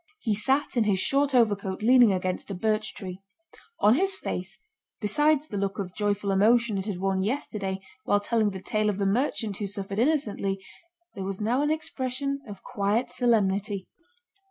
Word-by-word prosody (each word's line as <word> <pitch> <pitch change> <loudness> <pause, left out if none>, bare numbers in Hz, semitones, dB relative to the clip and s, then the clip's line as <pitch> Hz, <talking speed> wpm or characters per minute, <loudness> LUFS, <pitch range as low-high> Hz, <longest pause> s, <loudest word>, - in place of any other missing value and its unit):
He 225 -7 0
sat 265 +8 +1
in 235 -3 +3
his 200 -2 +2
short 275 +4 +2
overcoat 205 -4 +1
leaning 245 -1 +6
against 185 0 -2
a 195 - -3
birch 215 +3 -1
tree. 185 -1 -7 0.6
On 210 - +6
his 385 +8 +1
face, 185 - -5 0.4
besides 295 +7 +2
the 205 - -5
look 195 0 -2
of 185 -3 -4
joyful 205 -1 -1
emotion 215 +1 +3
it 190 - -5
had 200 -4 -2
worn 190 0 0
yesterday 200 -4 -2 0.2
while 205 - +2
telling 215 0 +1
the 190 -1 -7
tale 215 +1 0
of 200 - -1
the 200 - 0
merchant 220 -1 0
who 205 - -3
suffered 195 +1 -4
innocently, 225 -8 0 0.5
there 195 - -5
was 195 0 -4
now 235 +5 +1
an 295 - +1
expression 275 -2 -2
of 200 - -9
quiet 220 0 -1
solemnity. 205 -4 +1
210 Hz, 175 wpm, -27 LUFS, 195-245 Hz, 0.6 s, leaning